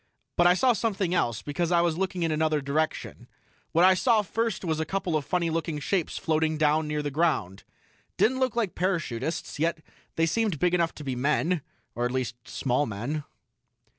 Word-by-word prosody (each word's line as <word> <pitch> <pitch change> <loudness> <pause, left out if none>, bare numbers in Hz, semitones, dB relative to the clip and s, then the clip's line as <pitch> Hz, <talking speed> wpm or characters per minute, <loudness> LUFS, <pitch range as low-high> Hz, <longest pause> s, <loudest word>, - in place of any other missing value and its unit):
But 175 - +5
I 180 - +5
saw 250 +5 +4
something 200 -6 -1
else, 120 -11 0
because 165 +4 -2
I 170 -1 +4
was 170 -2 +1
looking 185 0 -2
in 165 - +1
another 155 0 +1
direction. 145 +3 -2 0.4
What 170 +2 +5
I 190 - +7
saw 220 +2 +3
first 225 -1 -2
was 160 -2 0
a - - +1
couple 180 0 -2
of 155 - 0
funny 170 -2 0
looking 160 -2 -2
shapes 175 +3 -1
floating 155 0 0
down 155 0 +2
near 150 0 -2
the 145 - -2
ground. 135 - 0 0.5
Didn't 260 +3 +3
look 260 -3 +1
like 225 -6 0
parachutists, 165 -6 -2
yet 165 0 0 0.3
they 165 - +3
seemed 210 0 0
big 180 +3 +1
enough 170 -2 +1
to 150 - -8
be 135 -3 -3
men 150 +6 +1 0.3
or 120 - -1
at 125 - -1
least, 125 -2 -2
small 135 +2 0
men." 125 +9 -4
160 Hz, 195 wpm, -27 LUFS, 150-180 Hz, 0.5 s, I